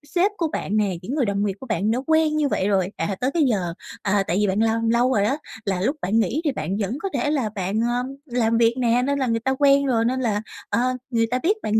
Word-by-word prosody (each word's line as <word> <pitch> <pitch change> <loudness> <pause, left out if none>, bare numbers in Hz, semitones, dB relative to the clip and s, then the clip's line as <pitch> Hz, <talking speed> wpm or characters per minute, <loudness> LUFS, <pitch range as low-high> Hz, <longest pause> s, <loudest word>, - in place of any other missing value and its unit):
sếp 370 +4 +3
của 330 - 0
bạn 215 -8 -2
nè, 205 -2 +2
những 240 +10 -4
người 280 -5 +1
đồng 200 0 0
nghiệp 200 - -1
của - - -9
bạn 215 -1 0
đã 240 - 0
quen 315 -1 +3
như 300 -1 +2
vậy 195 -7 0
rồi, 190 -3 +1
à, 165 +4 -1
tới 255 +2 +1
cái 335 - +3
giờ, 195 -10 0 0.3
à, 200 0 +1
tại 175 - 0
vì 210 - +2
bạn 190 +2 0
làm 225 0 +1
lâu 240 +3 +3
rồi 200 - +2
đó 265 +8 +1 0.3
là 190 -3 -1
lúc 265 +10 +1
bạn 210 +5 +1
nghỉ 245 +7 0
thì 295 - +2
bạn 190 - -3
vẫn 215 +4 -2
có 390 - -1
thể 285 +2 0
là 265 -8 0
bạn, 195 +2 -1
ờ, 240 +1 0 0.2
làm 235 -4 +1
việc 230 0 +4
nè 245 -1 +2
nên 280 +1 0
là 260 - 0
người 230 -1 +1
ta 265 +3 0
quen 280 -1 +5
rồi 230 -4 +1
nên 255 +2 0
là, 210 -4 0 0.3
ờ, - - +1 0.3
người 230 -2 +2
ta 255 - +1
biết 410 +5 +2
bạn 215 +1 +2
230 Hz, 280 wpm, -23 LUFS, 205-270 Hz, 0.3 s, quen